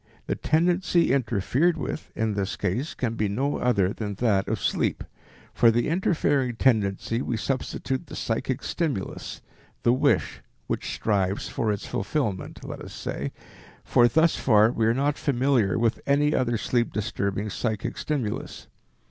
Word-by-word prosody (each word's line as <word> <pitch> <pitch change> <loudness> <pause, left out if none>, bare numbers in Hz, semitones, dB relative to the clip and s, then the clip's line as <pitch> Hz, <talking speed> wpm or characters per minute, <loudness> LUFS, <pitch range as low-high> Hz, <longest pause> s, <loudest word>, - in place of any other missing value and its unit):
The - - -1
tendency 170 0 +2
interfered 130 - +1
with, - - -4
in 110 -1 0
this 100 -1 -2
case, 125 - -2
can 120 -3 -1
be 110 -2 0
no 135 +9 -1
other 100 -6 +2
than 105 -3 -4
that 100 -3 +1
of - - -1
sleep. - - 0 0.5
For 115 - +5
the 120 +3 +1
interfering 145 -7 +1
tendency 110 -1 +1
we 120 - -2
substitute 130 +4 -2
the - - -8
psychic 120 +3 -2
stimulus, 145 - -3 0.4
the 120 - +4
wish 125 - +1 0.2
which - - -3
strives 100 -2 0
for 110 -2 0
its 100 - -3
fulfillment, 105 -4 -3
let - - -7
us - - -9
say, 70 +2 -4 0.5
for 120 - +4
thus 160 +5 +3
far 110 -2 +4
we 115 -3 +1
are 115 - +4
not 145 +2 0
familiar 125 -7 +2
with 115 0 +1
any 145 +2 +3
other 120 -2 +1
sleep 120 +2 0
disturbing 100 0 -2
psychic 110 -2 -2
stimulus. 130 -9 -3
120 Hz, 150 wpm, -26 LUFS, 105-140 Hz, 0.5 s, For